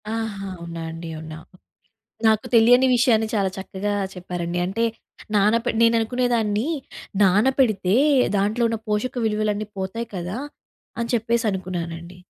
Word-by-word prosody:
ఆహా! 220 -3 -4
అవునాండి 165 -1 -7
అవునా! 155 0 -8 0.9
నాకు 220 +2 +3
తెలియని 245 +3 +6
విషయాన్ని 225 -3 +3
చాలా 200 -3 +2
చక్కగా 195 +1 -3 0.2
చెప్పారండి. 175 -1 -4
అంటే 215 +5 -1 0.5
నానపె 220 +4 +3
నేను 230 0 +5
అనుకునేదాన్ని 230 0 0 0.5
నానపెడితే, 205 -1 +3 0.4
దాంట్లో 210 +4 +1
ఉన్న 225 0 -2
పోషక 210 +5 -1
విలువలన్నీ 215 -1 -1
పోతాయి 205 +5 -4
కదా! 180 +5 -4 0.6
అని 235 - -2
చెప్పేసి 230 0 +1
అనుకున్నానండి. 175 -2 -5
210 Hz, 110 wpm, -23 LUFS, 185-230 Hz, 0.9 s, తెలియని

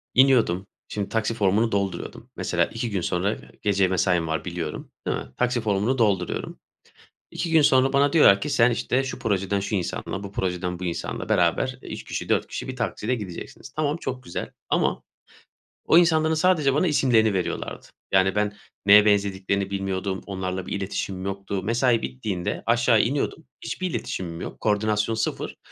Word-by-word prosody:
İniyordum. 120 -9 +4 0.2
Şimdi 100 -2 -4
taksi 110 0 0
formunu 110 +1 +2
dolduruyordum. 100 -1 -3
Mesela - - +1
2 115 +1 -4
gün 100 -4 -1
sonra, 90 +5 0 0.2
gece 100 -2 +2
mesaim 90 -2 +1
var 80 0 -2
biliyorum, 85 -1 -5 0.2
değil - - 0
mi? - - -6
Taksi 125 -1 +1
formunu 105 +4 +1
dolduruyorum. 100 -7 0 0.7
2 170 - -3
gün 160 -1 +6
sonra 135 -1 +4
bana 140 +1 +3
diyorlar 100 -12 +6
ki, 150 - -2
sen 120 -3 +4
işte 125 +3 0
şu 130 - -5
projeden 100 -4 0
şu 100 +2 -2
insanla, 95 +1 -3
bu 100 - -7
projeden 90 -2 -2
bu - - -6
insanla 85 -1 -4
beraber 90 +9 +1
3 - - -7
kişi, - - -5
4 - - +2
kişi - - -5
bir 130 - -5
taksiyle 125 0 -1
gideceksiniz. 95 -6 -8
Tamam, 150 0 0
çok 130 -5 -5
güzel 85 - -5 0.2
ama - - +1 0.8
o 165 - +6
insanların 160 -2 +4
sadece 155 -5 +3
bana 155 +6 +2
isimlerini 115 - +3
veriyorlardı. 90 - -3 0.3
Yani, 95 +1 +4
ben 105 0 +1 0.3
neye 105 +1 +8
benzediklerini 100 -1 +1
bilmiyordum, 95 -1 -2
onlarla 95 -1 -4
bir - - -5
iletişim 95 -1 -3
yoktu. 100 0 -3
Mesai 115 +2 +2
bittiğinde 90 +8 -3
aşağı 115 -1 +4
iniyordum. 140 +6 -1 0.2
Hiçbir 185 -1 -3
iletişimim 85 - -4
yok. - - -7
Koordinasyon 105 +1 +1
0. 110 0 -3
105 Hz, 165 wpm, -24 LUFS, 95-125 Hz, 0.8 s, neye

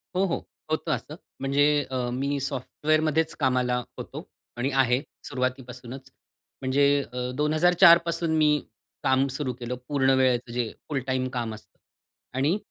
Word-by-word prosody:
हो, 190 +2 +3
हो. 170 - -1 0.3
होतं 155 0 -1
असं. 150 - -3 0.2
म्हणजे 140 +1 +2 0.3
अ, 125 -2 -1
मी 140 +2 -1
सॉफ्टवेअरमध्येच 155 +4 0
कामाला 125 -3 +2 0.2
होतो - - -7 0.3
आणि 125 +3 0
आहे, 125 +1 +1 0.3
सुरुवातीपासूनच. 130 0 -4 0.5
म्हणजे 135 +2 +2 0.3
अ, 125 0 -3
2004 170 +4 +6
पासून 170 -1 0
मी 150 -1 +4 0.4
काम 135 +1 +3
सुरु 130 -4 -2
केलं, 125 0 -5
पूर्ण 135 -2 +2
वेळेचं 125 -2 +2
जे 120 -2 -1 0.2
फुल 145 -3 0
टाईम 130 -1 0
काम 120 -3 -2
असतं 110 - -18 0.6
आणि 150 +8 +2
135 Hz, 135 wpm, -26 LUFS, 125-155 Hz, 0.6 s, 2004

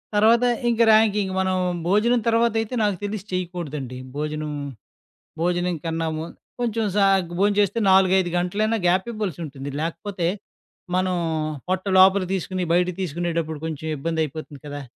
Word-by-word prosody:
తర్వాత, 225 +3 +5 0.3
ఇంక 235 -1 0
ర్యాంకింక 210 -3 +3
మనం, 190 0 +1 0.3
భోజనం 220 +6 +3
తర్వాతయితే 230 0 +1
నాకు 205 -3 +1
తెలిసి 205 -1 -4
చేయకూడదండి. 160 -8 -4 0.2
భోజనం, 150 +1 -3 0.9
భోజనం 175 0 0
కన్నా 165 0 -1
ము 160 - -4 0.4
కొంచెం 230 -2 0
సాగ్, 195 -3 +3
భోం 205 +1 +4
చేస్తే, 205 +3 +2
4,5 190 -1 +4
గంటలైనా 210 +6 0
గ్యాపీబల్సుంటుంది. 175 -8 -2
లాకపోతే, 170 +2 -3 0.7
మనం 185 0 +1 0.5
పొట్ట 185 +1 -1
లోపల 190 +1 +6
తీసుకొని, 185 0 -2
బయట 180 +1 +3
తీసుకునేటప్పుడు 165 -2 -2
కొంచెం 160 -1 -5
ఇబ్బందయిపోతుంది 155 -1 -3
కదా! 145 0 -6
185 Hz, 120 wpm, -23 LUFS, 165-205 Hz, 0.9 s, లోపల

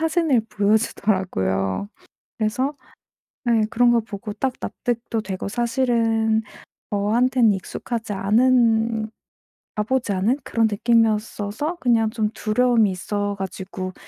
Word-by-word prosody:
사진을 320 -5 +2
보여주더라고요. 190 - 0 0.5
그래서 235 +6 0 0.8
예 230 -2 +4
그런 240 +1 +4
거 240 - +4
보고 210 -1 -7
딱 255 +4 -1
납득도 235 -1 -3
되고 190 -2 -5
사실은 230 -2 +1 0.5
저한테는 225 +3 +3
익숙하지 220 +3 -5
않은 225 +1 +2 0.7
가 210 - 0
보지 250 -1 -1
않은 210 +8 +1
그런 230 -2 +1
느낌이었어서 225 - 0
그냥 230 -6 +2
좀 220 -2 -1
두려움이 225 -1 +2
있어 205 +3 -2
가지고 185 0 -5
225 Hz, 270 characters per minute, -22 LUFS, 205-240 Hz, 0.8 s, 예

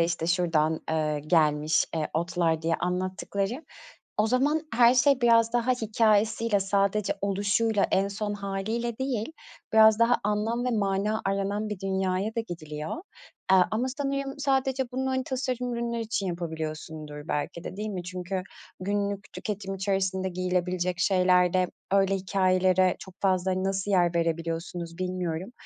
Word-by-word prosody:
işte, 165 -1 0
şuradan, 165 -3 +1
ııı, 155 -2 0
gelmiş, 155 -1 +2
eee, 155 -2 -1
otlar 165 -1 0
diye 165 0 +1
anlattıkları, 190 - -2 0.5
o 215 - +4
zaman 285 +6 +2
her 240 +1 +6
şey 275 +1 +4
biraz 230 -1 +4
daha 240 +1 +1
hikâyesiyle, 220 -1 +2
sadece 200 +1 +1
oluşuyla, 205 +2 +1
en 195 +1 +3
son 205 +1 -3
hâliyle 215 +4 -3
değil, 260 +1 -2 0.4
biraz 220 0 +7
daha 235 +1 +4
anlam 215 +3 0
ve 250 - +1
mana 210 0 0
aranan 200 +2 -1
bir 205 -2 -5
dünyaya 190 +2 -1
da 230 - +2
gidiliyor. 155 - -6 0.5
Aaa, 190 -1 +7
ama 225 +4 0
sanırım 275 0 -2
sadece 265 -2 0
bunu, 265 +1 -1
hani, 260 0 -1
tasarım 250 -2 -2
ürünler 235 0 -2
için 220 -3 -2
yapabiliyorsundur 160 -3 -5
belki 165 +4 -3
de, 185 - -6
değil 215 +1 -3
mi? 185 -3 -4
Çünkü 185 +1 -4 0.4
günlük 200 +1 -2
tüketim 195 -2 -4
içerisinde 190 -1 -1
giyilebilecek 180 0 -1
şeylerde 180 -1 +3 0.3
öyle 195 0 +3
hikâyelere 185 -1 +2
çok 190 - -11
fazla, 190 -1 +2
hani, 185 +1 -1
nasıl 195 +1 -1
yer 175 -2 +3
verebiliyorsunuz, 165 +1 -2
bilmiyorum. 180 +2 -3
195 Hz, 140 wpm, -27 LUFS, 180-225 Hz, 0.5 s, biraz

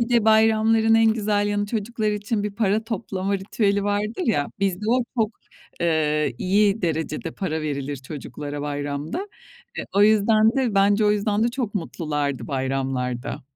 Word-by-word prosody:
bir 235 - 0
de 235 -3 +3
bayramların 220 0 +4
en 225 -1 +5
güzel 205 -2 0
yanı, 205 0 0
çocuklar 215 0 -2
için 210 +1 -2
bir 210 - -2
para 220 0 +1
toplama 200 -3 -2
ritüeli 200 +1 0
vardır 205 - -1
ya, 145 -11 +1
bizde 195 +1 -1
o 245 +2 +4 0.2
çok, 215 -2 +2 0.5
eee, 150 -5 +1
iyi 200 +3 +2
derecede 160 -1 -2
para 160 -3 -3
verilir 145 -1 -3
çocuklara 145 +1 -7
bayramda. 145 - -4 0.5
E, - - -2
o 200 - +4
yüzden 215 +1 +5
de 250 -6 +1
bence 200 +2 +4
o 210 - +4
yüzden 210 +1 +1
de 235 - +3
çok 240 -4 -3
mutlulardı 150 -7 -3
bayramlarda. 130 -3 -2
205 Hz, 155 wpm, -23 LUFS, 150-220 Hz, 0.5 s, en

